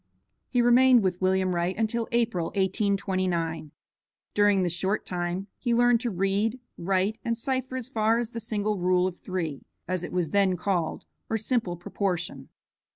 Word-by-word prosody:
He 245 -2 +2
remained 245 -1 +6
with 180 -1 -1
William 185 0 +2
Wright 175 +2 -1
until 225 +1 0
April, 230 -8 +1
1829. 185 -5 0 0.6
During 205 -2 +4
this 175 -2 0
short 190 +4 -1
time 180 +1 -3
he 240 -2 +1
learned 245 0 +4
to 245 - -1
read, 200 +5 0 0.2
write, 190 +4 0
and 230 -1 -1
cipher 260 +1 -2
as 250 -2 -5
far 225 -2 +2
as 240 -1 -2
the 230 - -5
single 215 -2 -2
rule 180 0 +3
of 185 -1 -3
three, 165 -6 -4 0.2
as 185 0 -2
it - - -5
was 175 -4 -1
then 195 -2 +3
called, 180 -2 -1 0.2
or 225 - +1
simple 220 -5 -1
proportion. 180 0 -3
195 Hz, 160 wpm, -27 LUFS, 180-230 Hz, 0.6 s, remained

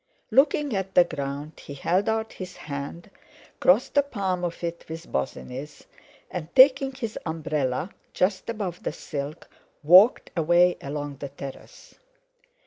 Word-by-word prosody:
Looking 280 -2 +3
at 190 0 -3
the 180 - +8
ground 145 -1 -5
he 140 - -8
held 180 +9 +1
out 220 0 -1
his 185 -1 -8
hand, 145 +6 -7 0.5
crossed 200 +8 +3
the 285 - +5
palm 195 -10 -2
of 175 0 -4
it 170 0 -4
with 165 +1 -8
Bosinney's, 130 - -5 0.5
and 170 -4 -4
taking 270 0 +7
his 240 -5 -5
umbrella 155 -1 -2 0.2
just 185 +4 0
above 200 -6 -4
the - - -3
silk, 145 +2 -6 0.4
walked 185 +10 +6
away 175 +2 +4
along 145 0 -5
the 140 0 -6
terrace. 140 -1 -10
175 Hz, 135 wpm, -25 LUFS, 145-200 Hz, 0.5 s, the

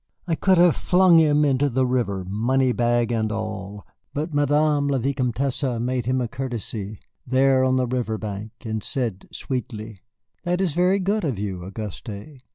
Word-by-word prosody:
I 170 - 0
could 185 +3 +3
have 175 -1 +5
flung 180 -2 +5
him 150 -1 +4
into 140 0 +2
the 130 +1 +1
river, 115 -7 -1
money 125 +6 +1
bag 120 0 +1
and 110 -2 0
all. 105 -2 -5 0.3
But 155 +2 -3
Madame 145 0 +2
la 140 -1 +1
Vicomtesse 130 0 -1 0.2
made 125 0 -2
him 130 +1 +1
a 120 - -1
courtesy 115 -5 -4 0.3
there 130 +1 +3
on 130 0 +2
the 130 -1 +2
levee 120 -3 -2
bank, 105 0 -6
and 110 -2 -3
said 120 -9 -3
sweetly: 110 -5 -5 0.4
"That 180 0 0
is 185 -6 0
very 180 +4 +3
good 200 +2 0
of 135 - -1
you, 95 -3 -4
Auguste." 105 - -8
130 Hz, 165 wpm, -23 LUFS, 110-145 Hz, 0.4 s, have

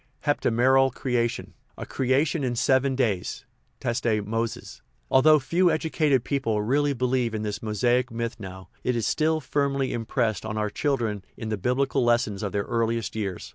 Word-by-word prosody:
Heptameral 135 -1 +3
creation; 120 -2 -2 0.2
a - - -6
creation 140 +4 0
in 125 -2 -1
seven 130 +2 +2
days 110 -9 -1 0.3
(teste 115 -3 0
Moses). 115 +2 -4 0.3
Although 155 +4 +6
few 170 +7 +2
educated 155 -5 +1
people 125 -7 -1
really 145 +5 +1
believe 125 -2 0
in 110 - -3
this 105 +1 -4
Mosaic 120 +4 +1
myth 115 0 -4
now, 95 -2 -9
it 125 - 0
is 115 - -1
still 155 +1 +1
firmly 140 -1 -1
im 115 -2 -4
pressed 115 -4 0
on 110 0 -4
our 105 -1 -1
children 115 -9 -1
in 110 - -5
the 110 - 0
biblical 125 +6 0
lessons 120 -4 +1
of 105 -3 -3
their 100 -1 -1
earliest 115 -2 -1
years. 100 -4 -4
120 Hz, 165 wpm, -25 LUFS, 110-135 Hz, 0.3 s, Although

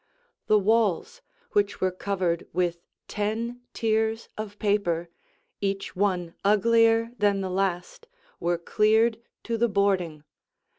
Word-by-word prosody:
The 215 - +5
walls, 225 - +1 0.3
which 205 -1 +1
were 185 0 +1
covered 185 -2 -2
with 175 -1 0 0.3
ten 225 +4 -3
tiers 220 0 0
of 210 -1 -6
paper, 190 -6 0 0.5
each 195 -1 -2
one 180 -3 0
uglier 230 +2 +4
than 200 -1 +2
the 190 -1 -3
last, 190 - -2 0.3
were 175 0 0
cleared 220 +5 +2 0.2
to 230 -1 -2
the 235 0 +3
boarding. 190 -7 0
205 Hz, 115 wpm, -26 LUFS, 185-225 Hz, 0.5 s, The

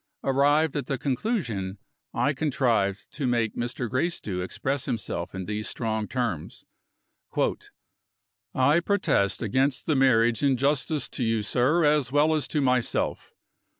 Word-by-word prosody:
Arrived 145 +3 +3
at 140 -4 -2
the 135 - -1
conclusion, 125 - -2 0.3
I 145 - +1
contrived 120 -9 0
to 140 -4 -3
make 120 -3 0
Mr. 120 +1 -3
Gracedieu 125 - -2
express 135 +8 -2
himself 95 -5 -4
in 95 -1 -4
these 105 +1 -3
strong 110 -2 -2
terms: 115 - -3 1.9
"I 140 +5 +4
protest 175 - +1
against 130 +5 0
the 155 - +1
marriage 120 -3 +3
in 140 -3 +3
justice 145 +2 0
to 125 - -3
you, 115 -2 +1
sir, 135 +10 +2
as 145 -3 +2
well 150 +3 +3
as 155 -2 0
to 150 - -1
myself. 125 -3 0
130 Hz, 135 wpm, -26 LUFS, 115-145 Hz, 1.9 s, I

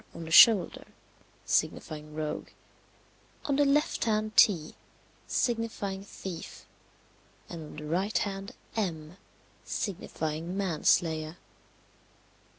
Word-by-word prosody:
on 170 - -7
the 160 - -8
shoulder, 200 0 +7 0.6
signifying 150 0 -1
rogue; 155 -1 -4 1.0
on 285 -2 +1
the 290 +1 +4
left 285 -1 +2
hand 215 -1 0
T, 165 -7 +5 0.5
signifying 225 -5 -1
thief; 190 -3 -8 0.8
and 170 - -7
on 150 - -11
the 150 0 -7
right 180 +5 0
hand 195 0 -3 0.2
M, 170 -5 -3 0.5
signifying 165 -2 -4
man 185 -6 -2
slayer. 160 0 +2
185 Hz, 100 wpm, -29 LUFS, 160-215 Hz, 1.0 s, shoulder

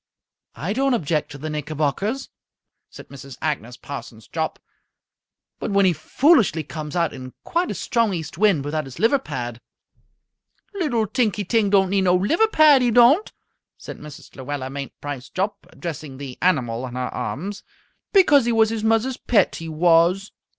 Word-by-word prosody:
"I 160 - -3
don't 270 +1 +2
object 155 -6 -1
to 145 - -8
the 150 +3 -6
knickerbockers," 155 - -2 0.6
said - - -13
Mrs. 135 -2 -11
Agnes 140 -6 -3
Parsons 115 -7 -9
Jopp, - - -3 1.0
"but - - -3
when 200 -1 +3
he 180 - +4
foolishly 225 - +3
comes 150 +1 -7
out 170 -3 +1
in 130 0 -9
quite 345 +2 -1
a - - -3
strong 230 -3 0
east 165 -5 -5
wind 185 -6 +2
without 155 0 -2
his 135 -2 -11
liver 235 +5 +3
pad 120 - -6 0.6
" - - -48
"Little 240 -10 +1
Tinky 215 -2 0
Ting 220 0 +2
don't 190 -2 +3
need 195 -1 +2
no 180 0 +4
liver 315 - +2
pad, 310 -9 +6
he 245 - +3
don't," 245 - +5 0.5
said - - -9
Mrs. 150 -1 -12
Luella 130 0 -5
Mainprice 140 -1 -7
Jopp, 195 +3 -3
addressing 155 -5 -7
the 135 -2 -7
animal 130 -8 +1
in 125 - -9
her 125 0 -2
arms, 170 - -4 0.5
"because 300 - +5
he 240 - +1
was 220 -1 +3
his 225 -1 -3
muzzer's 225 +3 +1
pet, 210 -6 +2
he 165 0 -7
was." 170 +4 +3
175 Hz, 165 wpm, -22 LUFS, 145-225 Hz, 1.0 s, pad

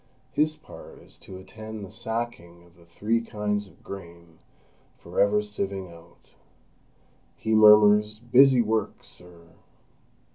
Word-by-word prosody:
His 155 +2 0
part - - -13
is - - -13
to 95 - -10
attend 110 +2 -9
the - - -13
sacking 110 -7 -5
of 85 0 -23
the 85 -1 -21
three 110 +7 -1
kinds 105 -2 -3
of - - -22
grain 85 -3 -11 0.6
for - - -6
ever 105 +1 +3
sieving 100 -3 -5
out. 85 0 -19 1.0
He 110 - -2
murmurs: 105 0 +6
"Busy 125 +2 +5
work, 110 -1 -2
sir!" 85 -2 -11
105 Hz, 130 wpm, -25 LUFS, 90-110 Hz, 1.0 s, murmurs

